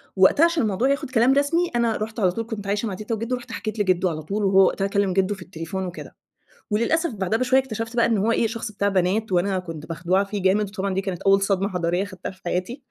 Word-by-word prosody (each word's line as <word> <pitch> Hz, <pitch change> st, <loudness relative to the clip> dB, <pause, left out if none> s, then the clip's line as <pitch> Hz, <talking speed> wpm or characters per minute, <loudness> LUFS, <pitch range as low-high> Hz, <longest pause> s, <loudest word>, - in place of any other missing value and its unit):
وقتها 190 Hz, -, +5 dB
عشان 335 Hz, -6 st, +1 dB
الموضوع 215 Hz, +6 st, +1 dB
ياخد 280 Hz, -2 st, -1 dB
كلام 250 Hz, +2 st, +4 dB
رسمي، 330 Hz, +5 st, +2 dB
أنا 235 Hz, -2 st, +1 dB
رُحت 220 Hz, +2 st, -5 dB
على 185 Hz, -3 st, +3 dB
طول 230 Hz, +4 st, -4 dB
كنت 210 Hz, -4 st, -6 dB
عايشة 205 Hz, +3 st, -1 dB
مع 200 Hz, -, -3 dB
تيتا 215 Hz, +4 st, -3 dB
وجِدُّو، 230 Hz, +3 st, -2 dB
رُحت 245 Hz, 0 st, -10 dB
حكيت 215 Hz, 0 st, -5 dB
لجِدُّو 185 Hz, -2 st, +2 dB
على 155 Hz, -1 st, -4 dB
طول، 205 Hz, +6 st, -2 dB
وهو 195 Hz, 0 st, +6 dB
وقتها 195 Hz, +2 st, 0 dB
كلّم 200 Hz, -2 st, 0 dB
جدو 195 Hz, +2 st, +1 dB
في 190 Hz, -, -14 dB
التليفون 180 Hz, +1 st, -5 dB
وكده، 180 Hz, +1 st, -8 dB, 0.6 s
وللأسف 255 Hz, +8 st, +1 dB
بعدها 200 Hz, +2 st, -1 dB
بشوية 255 Hz, +1 st, +3 dB
اكتشفت 225 Hz, -2 st, -5 dB
بقى 235 Hz, -, +4 dB
إنّه 225 Hz, -4 st, +1 dB
هو 230 Hz, -, +3 dB
إيه؟ 230 Hz, -, +2 dB
شخص 225 Hz, -1 st, -5 dB
بتاع 200 Hz, 0 st, 0 dB
بنات، 195 Hz, +3 st, 0 dB
وأنا 185 Hz, +2 st, +1 dB
كنت 165 Hz, -3 st, -8 dB
مخدوعة 175 Hz, +4 st, +1 dB
فيه 200 Hz, -1 st, -5 dB
جامد، 200 Hz, +2 st, +2 dB
وطبعًا 195 Hz, -1 st, -3 dB
دي 195 Hz, -, +1 dB
كانت 190 Hz, -3 st, -5 dB
أول 195 Hz, 0 st, +4 dB
صدمة 195 Hz, 0 st, +1 dB
حضارية 180 Hz, -1 st, -1 dB
خدتها 185 Hz, -3 st, -7 dB
في 185 Hz, -, -17 dB
حياتي؛ 185 Hz, +8 st, -2 dB
200 Hz, 240 wpm, -23 LUFS, 185-230 Hz, 0.6 s, وهو